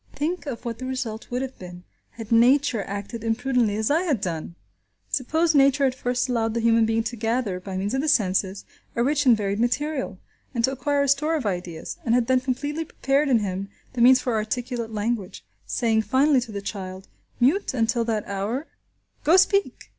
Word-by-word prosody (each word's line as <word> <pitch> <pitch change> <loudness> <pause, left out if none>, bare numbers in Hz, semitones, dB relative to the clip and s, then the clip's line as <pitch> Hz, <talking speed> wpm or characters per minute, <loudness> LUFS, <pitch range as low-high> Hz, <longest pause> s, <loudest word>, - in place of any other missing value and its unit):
Think 305 +1 -2
of 250 -3 -5
what 230 -1 -4
the 255 - -5
result 240 -4 -4
would 250 +2 -2
have 265 0 -7
been 180 -1 -10 0.3
had 225 -1 -9
Nature 245 0 +4
acted 205 +3 -6
imprudently 230 -1 +1
as 220 +4 0
I 320 +3 +3
had 305 - 0
done! 170 -3 -4 0.6
Suppose 320 +5 +1
Nature 275 0 +4
had 265 -2 +3
first 250 0 -1
allowed 225 -3 0
the - - +1
human 230 -1 +3
being 225 0 +1
to 240 +1 -4
gather, 225 -4 -1
by 185 0 -6
means 200 +4 -2
of 265 - +1
the 310 - -2
senses, 195 -6 +1 0.3
a 235 - +2
rich 290 +1 +1
and 235 -3 +7
varied 200 0 -2
material, 265 0 -1 0.4
and 230 - 0
to 260 - +3
acquire 285 +1 0
a - - 0
store 300 +4 +2
of 290 -7 -2
ideas, 180 -4 -4
and 235 -1 +2
had 245 -1 +2
then 255 +1 +3
completely 285 +5 -2
prepared 280 0 0
in 235 -4 +4
him 195 0 -3 0.2
the 245 - -2
means 255 +2 +7
for 250 -2 -2
articulate 230 +2 -2
language, 215 -2 -3 0.2
saying 225 -2 +1
finally 265 +3 +3
to 235 -2 -7
the 200 -1 -5
child, 190 -2 -6 0.3
mute 280 +5 +2
until 230 0 +1
that 220 -2 -1
hour, 205 +9 -3 0.6
"Go–Speak!" 375 +4 +3
240 Hz, 195 wpm, -24 LUFS, 215-270 Hz, 0.6 s, and